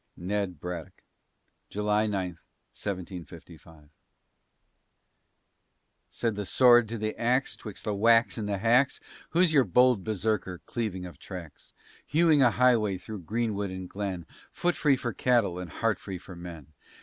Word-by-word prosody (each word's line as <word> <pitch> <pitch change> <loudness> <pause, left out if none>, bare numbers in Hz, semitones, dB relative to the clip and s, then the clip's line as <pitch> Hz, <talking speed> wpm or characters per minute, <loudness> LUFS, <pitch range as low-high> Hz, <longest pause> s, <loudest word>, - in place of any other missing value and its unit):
NED 95 -2 -2
BRADDOCK 90 -1 -7 0.7
[July 105 +1 +1
9, 95 -3 -1 0.4
1755] 85 -4 -8 2.2
Said 115 -2 -1
the 105 0 -4
Sword 120 +3 +5
to 115 - -3
the 110 0 -2
Ax, 125 +3 +1
'twixt 105 -4 -8
the 105 - -1
whacks 115 +3 +4
and 105 -3 -4
the 100 - 0
hacks, 120 +6 +3 0.3
"Who's 170 -1 +3
your 140 -3 +6
bold 125 +1 +4
Berserker, 105 -2 -1
cleaving 105 -6 -3
of 90 - -11
tracks? 90 -5 -10 0.3
Hewing 155 -1 +3
a 125 - +6
highway 115 -5 +3
through 105 +2 -8
greenwood 105 +1 -2
and 95 0 -6
glen, 95 -3 -4 0.3
Foot 175 0 0
free 145 -3 +3
for 120 -3 -4
cattle 115 -8 +2
and 90 -2 -6
heart 115 +5 -1
free 95 -2 -6
for 90 +1 -11
men?" 85 -4 -10
105 Hz, 140 wpm, -28 LUFS, 90-120 Hz, 2.2 s, your